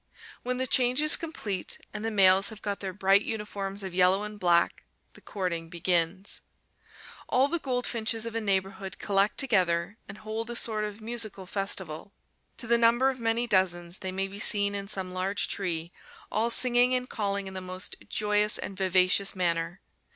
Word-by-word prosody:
When 250 0 -3
the 260 - -1
change 250 0 +2
is 305 +1 +10
complete, 210 - -3 0.2
and 210 0 -6
the 225 - -1
males 195 -1 +5
have 220 -2 -12
got 205 -1 -3
their 190 -1 -5
bright 195 +1 +3
uniforms 205 -3 -5
of 190 -2 -6
yellow 185 +2 +3
and 210 0 -7
black, 170 -2 +1 0.3
the - - -16
courting 170 -4 -4
begins. 175 +2 0 0.9
All 260 +2 +3
the 340 +3 -2
goldfinches 235 -4 -1
of 230 - -6
a 230 - -2
neighborhood 195 -1 -2
collect 200 0 0
together 190 -5 0
and 200 - -9
hold 220 +2 -5
a 240 - -5
sort 215 -2 +1
of 210 +1 -8
musical 220 -4 -3
festival. 190 -2 -4 0.4
To - - -4
the 235 0 +3
number 240 +3 +3
of 260 - -10
many 230 +1 0
dozens 180 -4 0
they 190 - -4
may 195 +1 -2
be 200 +1 -9
seen 205 -1 +5
in 200 0 -4
some 190 -3 -2
large 190 +2 -1
tree, 170 -3 -3 0.4
all 225 +2 0
singing 245 +1 +2
and 250 0 -2
calling 200 -3 -3
in 190 - -6
the 185 - -5
most 185 +1 -6
joyous 210 0 +2
and 195 - -6
vivacious 185 +1 +3
manner. 170 -1 -2
200 Hz, 180 wpm, -27 LUFS, 185-225 Hz, 0.9 s, is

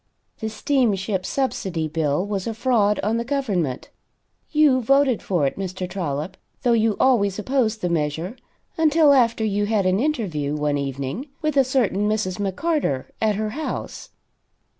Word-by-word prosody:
The 220 - -3
Steamship 215 -7 0
Subsidy 190 - -1
bill 155 +2 0
was 200 -1 -3
a 225 - -3
fraud 220 -4 +2
on 215 +3 +1
the 235 - -1
government. 210 - -2 0.6
You 295 -4 +4
voted 275 0 +3
for 175 -7 0
it, 135 - -2
Mr. 185 -1 -4
Trollop, 175 -1 -4 0.3
though 245 -2 +3
you 220 -2 +2
always 205 -7 +3
opposed 225 -1 0
the 180 - 0
measure 165 - -2 0.4
until 310 -2 +5
after 230 -4 +3
you 205 0 0
had 210 -3 +1
an 185 +1 +2
interview 190 - -1
one 150 -1 0
evening 140 - -4 0.2
with 305 -2 0
a 275 - +6
certain 230 -6 +1
Mrs. 210 -3 -1
McCarter 200 - -1
at 215 -2 +2
her 215 +1 -2
house. 305 +6 -5
210 Hz, 155 wpm, -23 LUFS, 180-255 Hz, 0.6 s, a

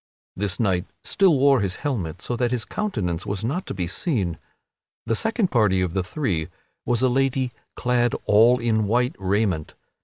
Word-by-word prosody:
This 95 -1 -1
knight 95 -4 +1 0.2
still 190 -7 +3
wore 135 0 +5
his 95 -2 -1
helmet, 95 - -3
so 120 - -2
that 120 0 0
his 120 -2 -2
countenance 95 - -2
was 100 +1 -3
not 145 +11 -2
to - - -4
be 90 -2 -2
seen. 90 - -2 0.7
The 115 - 0
second 220 - 0
party 105 -6 +3
of 90 -2 -1
the 95 - +1
three 90 - -2 0.4
was 120 +1 +2
a - - +5
lady 130 0 +1 0.2
clad 120 -1 +1
all 115 +4 +5
in 110 -3 +1
white 125 +6 +1
raiment. 95 -4 -1
115 Hz, 175 wpm, -23 LUFS, 95-130 Hz, 0.7 s, wore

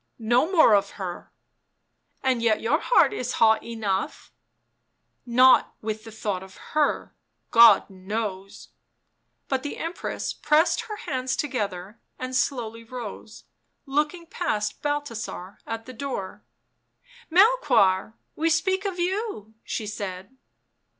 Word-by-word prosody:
" - - -50 0.2
No 315 +8 +3
more 320 - +6
of 200 -1 +2
her." 180 -3 -6 0.4
*' - - -47
And 255 -3 +1
yet 225 -2 +2
your 275 +8 +1
heart 485 - +4
is 250 -10 -3
hot 220 -1 +4
enough 220 +1 -3 0.3
" - - -50
" - - -50 0.2
Not 255 +2 +5
with 215 0 -5
the 225 - -9
thought 205 -4 -3
of 190 0 -13 0.2
her 305 -1 +1 0.2
— - - -49
God 230 0 +7
knows." 195 0 -5 0.8
But 265 -1 0
the 290 - -5
Emoress 335 +2 -4
pressed 315 +8 +2
her 430 -2 -6
hands 260 -8 -2
together 210 -8 -3 0.2
and 255 0 -5
slowly 230 -4 -1
rose, 225 -2 -8 0.4
looking 300 +5 -1
past 215 -12 -2
Balthasar 235 -10 -4
at 225 0 -5
the 255 - -9
door. 220 -6 -5 0.9
II 340 - -1
Melchoir, 295 - +4 0.2
we 325 +2 +1
speak 380 +4 +1
of 385 -2 -2
you," 360 - -3
she 220 - -4
said. 200 +1 -6
235 Hz, 135 wpm, -25 LUFS, 210-300 Hz, 0.9 s, God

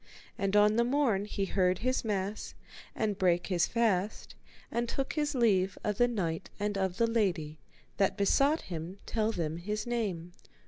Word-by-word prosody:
And 195 +1 -1
on 210 +1 +5
the 235 - +4
morn 240 -6 +1
he 200 -1 -2
heard 185 -1 +1
his 255 +4 0
mass, 205 -1 -3 0.4
and 210 -2 -1
brake 175 -2 +2
his 175 -4 +1
fast, 215 -4 0 0.4
and 235 0 -1
took 275 +2 -2
his 295 -2 -1
leave 195 -6 +2
of 210 -2 -2
the 245 - +5
knight 175 -9 -2
and 205 0 -1
of 190 -1 -1
the 230 - +3
lady, 175 -10 0 0.4
that 195 -2 +2
besought 275 +10 +3
him 170 +1 -6
to - - -11
tell 220 -1 +2
them 165 -5 -2
his 210 +5 -3
name. 200 -8 -2
205 Hz, 175 wpm, -31 LUFS, 185-230 Hz, 0.4 s, on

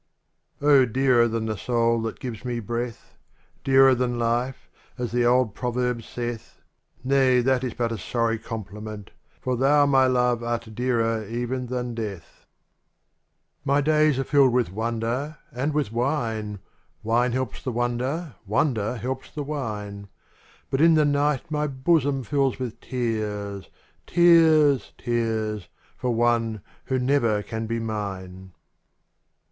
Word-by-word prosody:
n 145 - -2
^^M 135 -5 +6
DEARER 125 -2 +4
than 115 -1 -2
the 110 -1 -2
soul 115 +1 +1
that 115 0 -4
gives 120 -3 -6
me 120 -2 -2
^^3^ 110 - -9
breath. 120 +1 -4 0.5
Dearer 135 0 +6
than 125 -1 -1
life, 120 +3 -1 0.3
as 125 -2 -3
the 120 0 +2
old 125 -3 +3
proverb 125 0 -1
saith, 120 0 -6 0.2
— - - -50 0.2
Nay, 130 -1 +4
that 130 +1 +1
is 125 - -3
but 115 -1 -1
a 115 - -4
sorry 115 +4 -1
compliment: 105 -2 -7 0.3
For 130 -1 -1
thou, 145 +3 +4
my 135 -2 +4
love, 125 -2 +2
art 115 -1 -3
dearer 115 -2 0
even 120 +3 -3
than 125 -1 -3
death. 105 -7 -7 1.4
days 155 -2 +3
are 135 - 0
filled 135 -2 +4
with 120 -7 +1
wonder 115 +7 -2
and 135 +5 -1
witK 145 -8 -1
wine, 115 -5 -2 0.2
— - - -41
Wine 120 +2 +2
helps 130 -3 -3
the 130 - -3
wonder, 125 +6 -2
wonder 110 0 0
helps 130 +3 -4
the 150 - -5
wine 105 -8 -5 0.3
— - - -30
But 135 - +1
in 165 0 +6
the 155 -1 +4
night 145 0 0
my 150 0 0
bosom 140 0 +1
fills 135 +1 0
with 125 -4 -5
tears. 105 -5 -3 0.4
Tears, 160 -5 +5
tears, 110 -4 -2 0.3
for 125 - -3
one 115 -2 +1 0.2
who 130 - 0
never 125 -5 +1
can 110 +1 -5
be 115 +1 -2
mine. 95 -4 -5
120 Hz, 145 wpm, -25 LUFS, 115-135 Hz, 1.4 s, ^^M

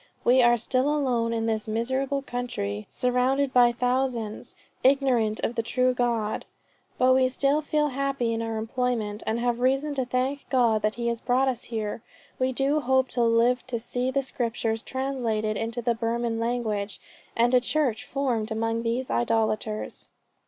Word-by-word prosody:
We 255 +2 +5
are 240 0 +5
still 255 +4 0
alone 250 -6 +1
in 225 -1 -1
this 220 -1 -1
miserable 260 +5 -1
country, 240 - -4
surrounded 255 +2 +1
by 245 -1 +6
thousands 245 -3 -2 0.3
ignorant 255 -5 +3
of - - -2
the 235 - 0
true 255 +2 +1
God."... 235 -3 -1 0.5
"But 255 0 +5
we 260 0 +4
still 275 +3 +1
feel 300 0 +1
happy 275 -3 -1
in 225 - -2
our 225 -1 -3
employment, 225 -2 -2
and 220 - +1
have 240 0 0
reason 270 +4 +1
to 265 -2 -1
thank 255 +3 -2
God 235 -5 +3
that 215 +1 0
he 235 0 -2
has 235 -1 -3
brought 255 +2 +2
us 250 -2 -1
here. 220 -1 -4 0.4
We 260 0 +1
do 275 +4 +1
hope 260 -1 +2
to 245 - -1
live 235 +2 +3
to 240 -2 -2
see 245 +2 -2
the 275 +1 0
Scriptures 230 -3 -2
translated 235 -6 -2
into 230 +3 -3
the 235 +1 +2
Burman 230 0 -1
language, 225 -4 -2 0.4
and 240 +2 +3
a 250 - +6
church 255 -3 0
formed 250 -6 -1
from 220 - -4
among 225 0 0
these 235 +3 -2
idolaters." 215 - -1
245 Hz, 170 wpm, -26 LUFS, 225-260 Hz, 0.5 s, by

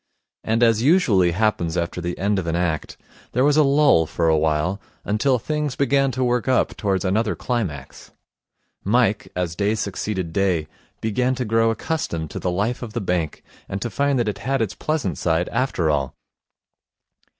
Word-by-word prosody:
And, 115 +2 +1
as 115 -2 +4
usually 125 - +4
happens 90 -3 0
after 85 +1 -2
the 85 +1 -3
end 100 0 +1
of 85 - -4
an 85 - 0
act, 85 -3 -2 0.4
there 125 - +2
was 145 0 +4
a 155 - +6
lull 140 - +4
for 85 +1 -1
a 80 - +4
while 80 +5 0 0.2
until 120 +6 +2
things 150 +2 -2
began 135 0 +2
to 130 +1 -1
work 125 -1 0
up 130 -1 +2
towards 100 -3 -1
another 105 +4 +1
climax. 95 - -4 0.7
Mike, 110 0 +1
as 90 -2 -2
day 105 +3 +1
succeeded 95 -4 -3
day, 90 -5 +1 0.3
began 125 +4 0
to 125 -1 -3
grow 115 +1 +2
accustomed 110 - -3
to - - -5
the 90 - -1
life 105 +7 -1
of 115 -3 -7
the 120 - -1
bank, 90 -6 -2 0.3
and 95 - -3
to 120 - -4
find 140 -1 +1
that 120 -3 0
it 100 -2 -2
had 135 +6 -1
its 110 -4 -1
pleasant 130 - -2
side 85 +1 +1
after 115 - 0
all. 70 -3 -1
105 Hz, 180 wpm, -22 LUFS, 90-125 Hz, 0.7 s, a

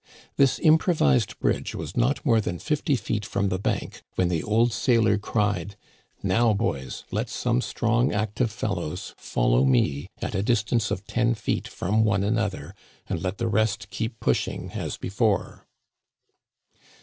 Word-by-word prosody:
This 135 -2 +4
improvised 160 - +3
bridge - - -1
was 80 +2 -6
not 125 +7 +1
more 115 -5 +4
than 90 -3 -3
fifty 150 - 0
feet 105 -1 -2
from 100 0 -1
the 95 - -1
bank - - -2
when 90 -1 +2
the 85 -3 0
old 115 +2 +2
sailor 115 -5 +3
cried: 105 -3 -1 0.3
" - - -38
Now, 115 -1 +3
boys, 65 -9 -2
let - - -2
some 60 - 0
strong 120 +2 +1
active 110 +3 0
fellows 95 -8 -4
follow - - +1
me 70 +2 +2
at - - -4
a 95 - 0
distance 110 -1 +1
of 95 - -3
ten 120 0 +1
feet 105 - -2
from 105 +5 0
one 105 -3 +2
another, 105 -1 -1 0.3
and - - -3
let 95 +1 -2
the 115 - -1
rest 105 -2 0
keep 115 0 -4
pushing - - -1
as - - -4
before 100 +1 -1
105 Hz, 155 wpm, -25 LUFS, 95-115 Hz, 0.3 s, This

